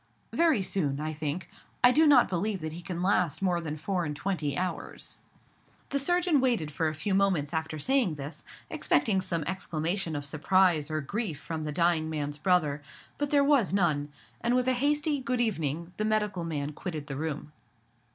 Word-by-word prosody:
"Very 320 -11 +3
soon, 145 -8 -1
I 155 +1 -3
think. 155 +3 -3 0.4
I 245 - +8
do 315 +4 +5
not 290 - +7
believe 190 +2 -1
that 155 0 -4
he 170 - -7
can 175 0 -4
last 180 -5 +2
more 175 -2 +1
than 155 -2 -4
four 175 +4 -2
and 150 -2 -3
twenty 150 -5 -2
hours." 185 0 -4 0.7
The 280 - +1
surgeon 350 -1 +3
waited 230 - +1
for 160 +2 0
a 155 - -2
few 190 +6 -2
moments 185 -6 +2
after 160 -1 -2
saying 240 - +2
this, 145 +2 -7 0.2
expecting 195 -4 +1
some 170 -3 -2
exclamation 170 -1 -2
of 145 -1 -3
surprise 160 +1 +2
or 155 0 -1
grief 190 - -2
from 160 0 -5
the 150 - -2
dying 165 0 +2
man's 145 -1 -3
brother: 150 -4 +2 0.4
but 290 -1 0
there 285 -1 +4
was 280 -9 +3
none; 150 -7 +1 0.3
and 240 +1 +2
with 250 0 +1
a 260 - +4
hasty 290 +3 +1
"good 250 -1 -1
evening" 170 - -1
the 215 - 0
medical 210 -4 0
man 150 -3 -3
quitted 155 -2 -5
the 140 - -5
room. 150 0 -4
175 Hz, 185 wpm, -29 LUFS, 155-215 Hz, 0.7 s, I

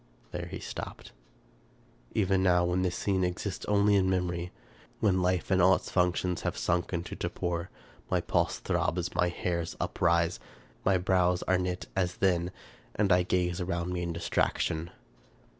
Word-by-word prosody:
There - - -4
he - - -6
stopped. - - -7 1.0
Even 95 -2 +2
now, 90 -2 +4
when 90 +1 +1
this 90 -1 0
scene 95 -1 0
exists 90 +2 -3
only 105 0 +3
in 95 -1 +3
memory, 90 -1 -1 0.5
when 95 -3 +2
life 90 +2 0
and 95 -1 +4
all 95 +1 +7
its - - -6
functions 90 -1 +1
have - - -2
sunk 85 0 0
into 85 -1 -3
torpor, 85 0 -3 0.4
my - - +2
pulse - - 0
throbs, 90 +1 -1
and - - -18
my 90 - +3
hairs 85 -1 -3
uprise; 85 -1 +1 0.4
my 95 -1 +4
brows 90 -1 +2
are 95 -1 +2
knit, 90 0 -2
as 90 -2 0
then, 90 -2 +1 0.5
and 100 -2 +2
I 90 0 +6
gaze 90 0 0
around 90 0 -2
me 90 - -2
in 85 -1 -2
distraction. 85 0 0
90 Hz, 160 wpm, -29 LUFS, 85-95 Hz, 1.0 s, all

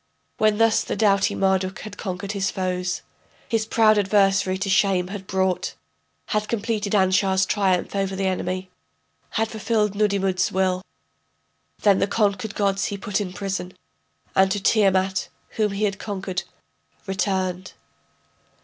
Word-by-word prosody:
When 215 -1 +3
thus 225 0 +3
the - - -3
doughty 200 -3 +2
Marduk 190 -1 0
had 210 -1 -8
conquered 195 -1 -4
his 200 -1 -1
foes, 180 -1 -2 0.4
His 225 -2 0
proud 215 -2 +4
adversary 195 -1 +2
to 195 +1 -3
shame 190 -2 +2
had 195 -1 -7
brought, 190 -1 0 0.5
Had 210 0 0
completed 215 -2 -1
Anshar's 190 0 +3
triumph 190 -2 0
over 195 -1 -1
the 195 0 -1
enemy, 185 0 -2 0.7
Had 220 0 +1
fulfilled 215 -1 0
Nudimmud's 195 -3 +1
will, 185 -1 +1 1.0
Then 200 -2 +5
the - - +2
conquered 205 0 0
gods 195 -1 +1
he 200 - -3
put 205 0 -2
in 185 -3 -4
prison, 185 -1 -4 0.6
And 190 0 +5
to 205 +2 0
Tiamat, 190 -2 +2 0.2
whom 215 -2 0
he 200 +2 -2
had 200 -2 0
conquered, 190 -3 -4 0.6
returned. 190 -2 -2
195 Hz, 140 wpm, -23 LUFS, 190-210 Hz, 1.0 s, Then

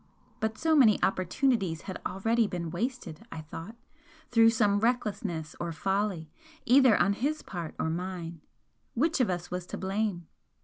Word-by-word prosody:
But 220 0 -2
so 320 +3 +2
many 235 -8 +6
opportunities 190 - +1
had 190 -2 -7
already 225 +4 +1
been 170 -4 -4
wasted, 195 - -4
I 160 - -6
thought, 165 +7 -9 0.6
through 225 -1 +6
some 210 -3 +2
recklessness 205 -9 -1
or 170 -1 -3
folly, 190 -1 -1 0.3
either 255 -2 +6
on 200 - +3
his 285 +9 -2
part 170 -4 -6
or - - -1
mine. 170 -1 -4 0.5
Which 315 +6 +1
of 245 - +2
us 175 -1 -3
was 180 0 -4
to - - -5
blame? 195 -2 -2
200 Hz, 150 wpm, -29 LUFS, 175-230 Hz, 0.6 s, many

